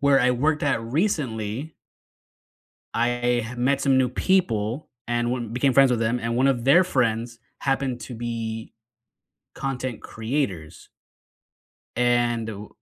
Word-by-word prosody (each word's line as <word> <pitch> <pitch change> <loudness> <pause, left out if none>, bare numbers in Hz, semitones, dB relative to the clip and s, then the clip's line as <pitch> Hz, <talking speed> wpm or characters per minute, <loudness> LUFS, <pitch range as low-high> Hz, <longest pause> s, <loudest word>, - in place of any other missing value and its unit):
where 140 -1 +5
I 125 - +4
worked 150 +5 +1
at 135 -6 +1
recently 130 - -2 1.2
I 120 0 0
met 135 +3 +1
some 135 -2 +3
new 130 -1 +3
people 125 - 0 0.2
and 120 0 0
one 120 -3 -3
became 130 +3 +2
friends 135 0 +6
with 120 -2 +1
them, 115 +2 +1
and 115 0 -2
one 130 +2 +3
of 125 -4 +1
their 150 +8 +6
friends 120 -6 0 0.2
happened 135 -2 -1
to 120 +2 -7
be 115 -1 -5 0.8
content 130 -3 -4
creators 110 - -4 1.1
and 120 -2 +2
wh 105 -1 -7
120 Hz, 130 wpm, -24 LUFS, 115-135 Hz, 1.2 s, friends